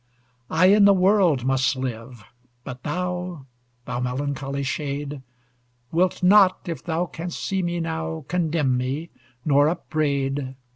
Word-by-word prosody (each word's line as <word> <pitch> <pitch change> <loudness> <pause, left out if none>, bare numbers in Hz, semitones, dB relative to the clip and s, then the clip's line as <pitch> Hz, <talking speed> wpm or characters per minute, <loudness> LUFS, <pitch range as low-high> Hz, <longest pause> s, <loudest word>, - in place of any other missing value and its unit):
I 185 +4 +4
in 205 -1 +6
the 200 -1 +6
world 185 - +3
must 135 +1 +2
live; 120 -2 -6 0.4
but 125 0 -8
thou, 180 -1 -4 0.4
Thou - - -3
melancholy 140 +2 -3
shade! 140 +1 -3 0.7
Wilt 180 +2 +1
not, 190 -1 +5
if 165 -6 -5
thou 170 +1 -1
can'st 170 0 -6
see 190 -1 -1
me 175 -1 -2
now, 160 -2 -4
Condemn 160 -6 +1
me, 140 +6 -3 0.3
nor 145 0 +4
upbraid. 140 -5 -2
155 Hz, 130 wpm, -23 LUFS, 135-175 Hz, 0.7 s, in